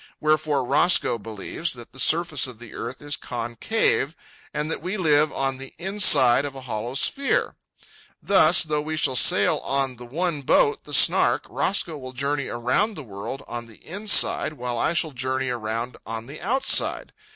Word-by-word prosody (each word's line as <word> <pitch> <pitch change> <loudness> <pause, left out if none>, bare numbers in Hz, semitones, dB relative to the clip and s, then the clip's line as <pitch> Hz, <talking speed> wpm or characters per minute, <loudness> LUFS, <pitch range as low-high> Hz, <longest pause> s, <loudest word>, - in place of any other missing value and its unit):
Wherefore 155 -3 +1
Roscoe 140 -2 +2
believes 110 +10 -4
that 120 -2 -11
the 135 - -13
surface 155 -1 +2
of 125 -3 -10
the 120 -1 -13
earth 125 +5 -7
is 145 -1 -1
concave 125 - -2 0.4
and 150 +1 -3
that - - -4
we 185 +5 -4
live 155 -4 +2
on 135 -1 -2
the 135 0 -11
inside 155 -10 +4
of 140 -1 -6
a 135 - -8
hollow 120 0 -5
sphere. 275 - 0 0.7
Thus, 175 -4 +4
though 150 -1 -2
we 155 +1 -4
shall 135 -4 0
sail - - +5
on 135 -2 -2
the 120 - -10
one 160 +3 -2
boat, 435 - +2
the - - -11
Snark, - - +4
Roscoe 170 -6 -2
will 130 -1 -9
journey 140 +2 -2
around 125 - -1
the 150 - -8
world 105 +4 -7
on 120 0 -6
the 110 - -16
inside, 200 -3 +3
while 125 -4 -4
I 160 - 0
shall 160 -2 0
journey 130 0 -2
around 115 0 -4
on 115 0 -6
the 145 +4 -11
outside. 265 +7 0
140 Hz, 175 wpm, -23 LUFS, 120-160 Hz, 0.7 s, sail